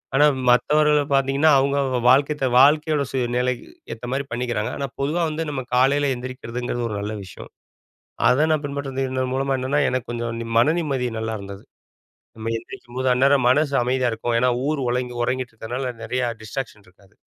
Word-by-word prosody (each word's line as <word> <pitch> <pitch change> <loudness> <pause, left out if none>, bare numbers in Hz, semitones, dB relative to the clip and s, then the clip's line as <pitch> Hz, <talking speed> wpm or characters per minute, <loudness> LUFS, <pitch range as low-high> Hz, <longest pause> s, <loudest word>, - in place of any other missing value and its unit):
ஆனா 145 +2 +6 0.2
மத்தவர்கள 150 +4 +4
பாத்தீங்கன்னா 135 +3 +3
அவுங்கவுங்க 135 -2 0
வாழ்க்கைத்த 140 +2 +3
வாழ்க்கையோட 150 +2 +4
சூழ்நிலைக்கு 125 -1 -1 0.3
ஏத்த 115 - -9
மாரி 140 +1 -1
பண்ணிக்கிறாங்க. 120 -1 -2
ஆனா 140 - -2
பொதுவா 150 +5 0
வந்து 155 +1 -3
நம்ம 140 -3 -3
காலைல 140 +2 +3
எந்திரிக்கிறதுங்கிறது 120 -1 -5
ஒரு 105 - -4
நல்ல 105 +1 -4
விஷயம். 90 -1 -11 0.8
அத 135 +5 +3
நான் 155 -1 +1
பின்பற்றது 140 -1 -3
இந்த 130 0 -1
மூலமா 135 +1 0
என்னென்னா 135 +3 0
எனக்கு 130 -2 -3
கொஞ்சம் 120 -1 -3
நி 115 - -6
மனநிம்மதி 145 -1 +1
நல்லாருந்தது. 100 -3 -5 0.7
நம்ம 110 +1 -4
எந்திரிக்கும்போது, 130 -1 -5
அந்நேரம் 135 0 +3
மனசு 145 +3 +3
அமைதியா 125 0 +1
இருக்கும். 115 +1 -1
ஏன்னா 125 +1 +3 0.2
ஊர் 155 -2 -1
உறங்கி- 125 0 -2
உறங்கிட்ருக்கனால 125 0 -3
நெறைய 125 +2 -2 0.2
டிஸ்ட்ராக்க்ஷன் 110 -2 -6
இருக்காது. 95 +1 -24
130 Hz, 150 wpm, -22 LUFS, 120-140 Hz, 0.8 s, ஆனா